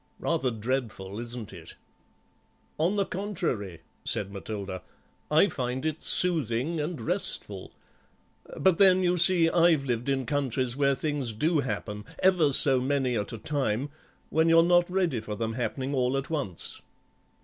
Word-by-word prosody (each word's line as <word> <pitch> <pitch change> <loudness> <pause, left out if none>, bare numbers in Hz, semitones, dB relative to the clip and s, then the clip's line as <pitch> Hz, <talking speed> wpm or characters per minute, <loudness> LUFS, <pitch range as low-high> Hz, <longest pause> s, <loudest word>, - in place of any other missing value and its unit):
Rather 130 - -1
dreadful, 110 -4 -4
isn't 120 -3 -6
it?" 85 -2 -12 1.0
"On 175 +6 +1
the 200 -1 +1
contrary," 125 - -4 0.2
said 100 -1 -2
Matilda, 100 -2 -6 0.5
"I 155 +6 +4
find 130 -3 -4
it 155 0 -2
soothing 155 -3 +2
and 150 0 -3
restful; 110 - -1 0.9
but 190 -3 +2
then, 185 -2 +5
you 180 0 +2
see, 170 -1 +4
I've 165 -4 +3
lived 120 0 -2
in 135 -1 0
countries 130 -4 -1
where 140 -1 +2
things 140 -5 -2
do 155 +8 +1
happen, 105 -6 -4
ever 180 -6 +3
so 135 -1 +6
many 130 -2 0
at 105 +1 -2
a 115 - -6
time, 135 +1 -2 0.4
when 160 +1 +2
you're 165 0 +6
not 175 0 +3
ready 180 -9 0
for 110 -1 -6
them 115 +1 -3
happening 130 +3 -3
all 130 0 0
at 135 +3 -5
once." 140 - -3
135 Hz, 150 wpm, -27 LUFS, 115-165 Hz, 1.0 s, so